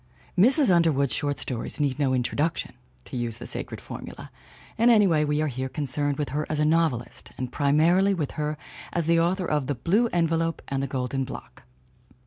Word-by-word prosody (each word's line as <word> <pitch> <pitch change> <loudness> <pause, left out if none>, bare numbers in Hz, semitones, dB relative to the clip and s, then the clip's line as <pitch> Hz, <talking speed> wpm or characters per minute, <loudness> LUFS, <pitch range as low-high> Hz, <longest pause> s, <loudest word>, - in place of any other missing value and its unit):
Mrs. 250 - +5
Underwood's 145 -6 +2
short 145 -1 -1
stories 125 -1 -4
need 140 -2 0
no 140 -2 +2
introduc 145 +6 0
tion - - -5 0.3
(to - - -9
use 120 -2 -2
the 120 - -8
sacred - - -4
formula), - - -9 0.4
and 230 +2 +4
anyway 195 -9 +4
we 150 +1 0
are - - 0
here 130 -1 -4
concerned 145 0 -1
with 150 - -2
her 150 +3 -1
as 155 - -1
a 150 - +3
novelist, 155 -6 0
and 125 -1 -4
primarily 170 +9 +3
with 150 -6 -2
her 150 0 -3 0.3
as 170 -2 0
the 165 +1 +3
author 180 +3 +1
of 150 -5 -1
The 145 - -1
Blue 195 - +2
Envelope 165 -3 0
and 135 -1 -1
The 135 - -2
Golden 135 0 -2
Block. 130 - -10
150 Hz, 190 wpm, -25 LUFS, 135-170 Hz, 0.4 s, Mrs